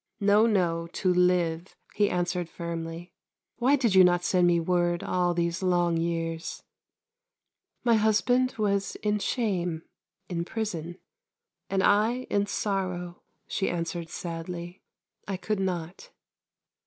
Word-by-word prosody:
" - - -49
No, 215 +2 +6
no, 170 -6 +1
to 185 -1 +1
live," 180 -1 +1 0.2
he 205 -1 +2
answered 175 -1 -1
firmly. 170 0 -6 0.2
" - - -63
Why 260 +4 +4
did 240 -7 +1
you 190 -1 +8
not 175 -1 +3
send 180 -1 +3
me 170 -1 +4
word 175 0 +1
all 180 -1 0
these 170 0 -1
long 175 -2 +2
years? 165 0 -3 0.4
" 485 +1 -63
" - - -55
My 235 - +4
husband 225 +4 +2
was 200 -2 0
in 210 0 +1
shame, 180 -8 -1 0.4
in 170 -2 -2
prison, 175 -5 -4 0.7
and 190 -1 +1
I 225 +5 +3
in 205 0 +1
sorrow," 185 -4 -3 0.3
she 195 - -1
answered 170 -1 -3
sadly. 170 +1 -6 0.2
" - - -42
I 195 -2 -2
could 210 +2 -2
not." 180 - -3
180 Hz, 140 wpm, -27 LUFS, 170-205 Hz, 0.7 s, you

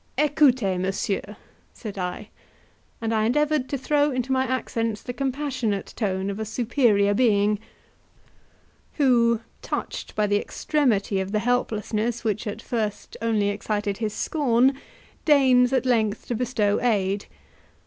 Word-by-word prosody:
"Ecoutez, 260 -10 +3
messieurs!" 195 +2 -2 0.4
said 215 -3 -7
I, 180 -2 -4 0.7
and 225 0 -1
I 215 -1 +2
endeavoured 295 +2 +1
to 280 - -1
throw 290 +2 +2
into 255 -1 -2
my 260 0 +2
accents 230 -4 -2
the 245 - -5
compassionate 255 -5 -2
tone 195 -2 -1
of 200 - -6
a - - -1
superior 220 -2 +2
being, 210 -3 +3 1.3
who, 235 -5 +3 0.2
touched - - -5
by 210 - +2
the 205 0 +1
extremity 225 -10 0
of 190 0 -3
the - - +2
helplessness, 230 0 -1
which 215 0 -1
at 210 +2 -5
first 215 -4 -3
only 220 -3 +1
excited 205 0 -2
his 220 -2 -2
scorn, 265 -3 +2 0.5
deigns 260 -4 +5
at 265 0 +1
length 220 -4 +1
to - - 0
bestow 220 -4 0
aid. 200 -4 0
225 Hz, 135 wpm, -24 LUFS, 205-255 Hz, 1.3 s, deigns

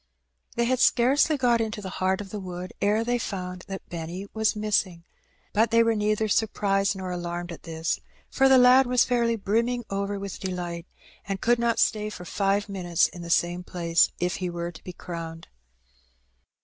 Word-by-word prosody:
They 235 - +1
had 255 +1 +1
scarcely 275 +6 +4
got 240 -3 +3
into 215 -1 -3
the 190 -2 -6
heart 190 +1 +1
of 195 -2 -9
the 210 - -4
wood 180 -1 -7
ere 210 +2 +2
they 240 +1 0
found 180 -4 -5
that 195 -1 -7
Benny 170 +3 -6
was 220 0 +1
missing; 195 -5 0 0.5
but 220 +2 +3
they 230 +1 +5
were 230 0 +2
neither 215 0 0
surprised 200 -2 +1
nor 185 -1 -5
alarmed 175 0 -4
at 170 - -9
this, 160 -1 -2 0.3
for 270 0 +4
the 265 - +7
lad 250 +1 +6
was 250 0 +3
fairly 235 -2 +1
brim 225 +2 +1
ming 245 -1 -2
over 200 +1 -2
with 195 -1 -6
delight, 175 -2 -4 0.4
and 195 -1 -2
could 240 +3 +2
not 235 -1 +1
stay 215 -1 +1
for 180 -4 -9
five 200 +2 0
minutes 180 -4 +1
in 175 - -10
the 170 - -7
same 175 +1 +1
place 170 -2 +2
if 180 0 -1
he 180 -1 -3
were 170 0 -4
to 165 - -14
be 180 - -7
crowned. 165 -2 -8
195 Hz, 190 wpm, -26 LUFS, 180-230 Hz, 0.5 s, the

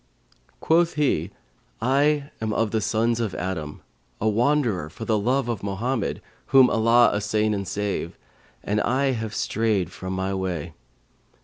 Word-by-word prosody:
Quoth 165 +1 +3
he, 150 -2 +1 0.5
'I 140 +4 +1
am 110 -1 -1
of 110 -1 0
the 110 - 0
sons 115 +2 +1
of 110 -5 -2
Adam, 80 -5 -4 0.4
a 110 - 0
wanderer 115 - +1
for 115 - -8
the 110 -2 +1
love 125 +4 +1
of 115 -5 -3
Mohammed 105 +4 -2 0.2
(whom 135 -2 +6
Allah 115 +2 +4
assain 105 +1 0
and 100 -2 -3
save!) 100 -4 -3 0.5
and 105 +1 0
I 135 +4 +1
have 110 -3 -4
strayed 105 -5 0
from 95 +1 -6
my 95 +1 -2
way.' 90 -4 -3
110 Hz, 145 wpm, -24 LUFS, 100-125 Hz, 0.5 s, whom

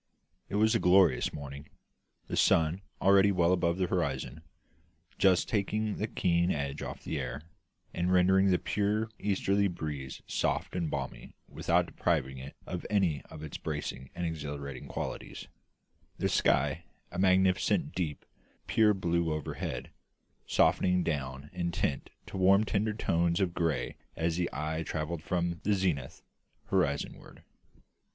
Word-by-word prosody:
It - - -3
was 110 +1 +4
a - - +3
glorious 90 -8 +4
morning; 70 0 -8 0.6
the - - -4
sun, 80 +3 +3 0.2
already 100 +1 +5
well 90 -2 +3
above 85 -1 +1
the 95 - +1
horizon, 70 -5 -2 0.8
just 95 -2 +4
taking 105 0 -1
the 110 - -1
keen 85 -3 +1
edge 70 -3 -2
off - - -6
the - - -3
air, 70 - -4 0.5
and 90 +1 0
rendering 95 +2 +5
the 90 -2 +4
pure 105 +3 0
easterly 100 0 +1
breeze 75 -6 -5
soft - - -1
and 85 -3 -1
balmy 70 -2 -5
without - - +1
depriving 65 -6 -1
it 65 +2 -9
of 90 -1 -5
any 95 -8 +2
of 80 -1 -9
its 75 - -6
bracing 75 -4 -4
and 90 - -2
exhilarating 75 -4 -5
qualities; - - -5 0.7
the - - 0
sky 75 +4 +2 0.3
a 85 - -5
magnificent, 95 - +3
deep, 80 -6 -3 0.4
pure 105 -2 +4
blue 85 -3 0
overhead, 75 -1 -4 0.6
softening 90 -1 +3
down 70 -3 -3
in 85 -1 -2
tint 70 -4 -1 0.2
to - - -7
warm 95 +2 +5
tender 105 0 0
tones 85 -4 +1
of 95 -3 +1
grey 85 -3 -1 0.2
as 80 0 0
the 90 0 0
eye 80 +1 -2
travelled 80 0 -3
from 85 0 -1
the 105 0 +2
zenith, 85 -9 -2 0.5
horizon 80 -7 0
ward. - - -16
85 Hz, 145 wpm, -30 LUFS, 75-95 Hz, 0.8 s, already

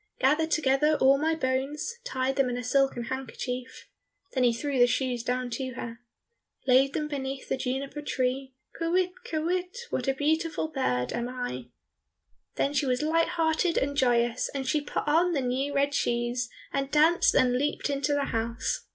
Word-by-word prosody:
"Gathered 305 +5 +3
together 300 0 +3
all 270 +1 +5
my 320 +2 +1
bones, 285 - -2
Tied 265 - -1
them 270 -2 +2
in 245 - -2
a 250 - -4
silken 270 -1 +1
handkerchief," 260 0 -5 0.5
Then 260 - +1
he 245 - +5
threw 260 +5 -3
down 265 - 0
the 245 - +7
shoes 245 -1 -1
to 250 +1 -2
her. 230 -1 -6 0.7
"Laid 270 +1 +4
them 300 -1 -1
beneath 270 -2 -4
the - - +1
juniper 270 +3 -3
tree, 260 -1 -2 0.2
Kywitt, 355 +2 +1
kywitt, 360 +1 -2
what 250 - -2
a 270 - +2
beautiful 315 +2 0
bird 125 - -1
am 240 +1 -2
I!" 245 - -4 0.9
Then 280 - 0
she 290 -1 +1
was 250 +2 +1
light 325 +2 +2
hearted 325 +1 +2
and 285 +1 0
joyous, 240 -3 +2
and 265 -1 -3
she 300 +3 +2
put 290 - -4
on 340 +4 +3
the 285 - +1
new 260 +3 -1
red 280 0 +1
shoes, 240 -1 0 0.2
and 275 -1 -1
danced 315 +4 +4
and 250 -1 +4
leaped 290 +4 0
into 280 +1 0
the 285 -1 +1
house. 230 +1 -2
270 Hz, 175 wpm, -28 LUFS, 250-300 Hz, 0.9 s, the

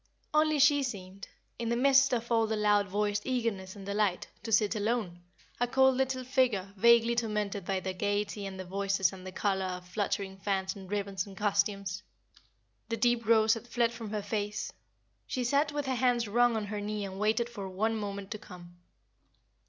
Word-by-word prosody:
Only 305 0 +3
she 285 0 +5
seemed, 195 -6 -6 0.3
in 230 -1 -2
the 235 - +1
midst 275 +2 +5
of 235 -1 -2
all 225 -1 +3
the 220 - -1
loud 210 -1 +3
voiced 205 +1 -1
eagerness 225 -7 -2
and 195 -1 -10
delight, 200 -2 0 0.2
to 225 - -6
sit 210 -1 +3
alone, 210 -5 -1 0.4
a 245 - +2
cold 265 +1 +4
little 260 0 0
figure 245 -7 +1
vaguely 235 +3 +5
tormented 210 -4 -2
by 190 0 -1
the 190 0 -3
gayety 205 +1 -2
and 190 -1 -8
the 185 - -5
voices 195 0 0
and 185 0 -10
the - - -6
color 190 0 0
of 180 -1 -6
fluttering 195 0 -2
fans 190 -1 -1
and 190 -2 -10
ribbons 200 -2 -2
and 195 -1 -12
costumes. 200 -2 0 0.9
The 230 - -1
deep 235 0 +1
rose 220 -1 +5
had 230 +1 -6
fled 235 0 +1
from 225 -2 -7
her 210 -1 -3
face; 210 0 -3 0.5
she 255 - -2
sat 285 +4 +2
with 290 -1 -2
her 265 - 0
hands 245 -2 +2
wrung 240 +2 +3
on 215 - -2
her 205 0 -4
knee 210 0 -3
and 190 0 -7
waited 220 +3 +1
for 205 -5 -7
one 215 +4 0
moment 200 -2 -5
to 215 - -4
come. 175 -3 -13
210 Hz, 190 wpm, -30 LUFS, 195-235 Hz, 0.9 s, she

